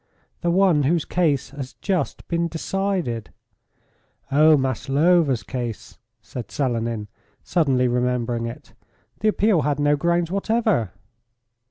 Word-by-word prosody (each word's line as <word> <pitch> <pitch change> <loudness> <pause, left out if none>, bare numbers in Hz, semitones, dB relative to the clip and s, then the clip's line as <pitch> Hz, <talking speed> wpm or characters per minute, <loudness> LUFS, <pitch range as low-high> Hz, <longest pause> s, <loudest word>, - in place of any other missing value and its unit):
"The 175 - 0
one 180 -3 +4
whose 155 +3 +1
case 150 -7 0
has 135 -2 -7
just 190 -4 -2
been 170 0 0
decided." 170 - -2 1.0
"Oh! 155 +2 +6
Maslova's 135 +2 +2
case," 120 -4 -6 0.2
said 125 - -7
Selenin, 115 -6 -2 0.4
suddenly 135 -7 +2
remembering 120 -1 0
it. 115 - -10 0.5
"The 215 - 0
appeal 210 -4 +3
had 145 +1 0
no 145 0 +3
grounds 170 +2 0
whatever." 200 - +1
145 Hz, 115 wpm, -23 LUFS, 125-175 Hz, 1.0 s, Oh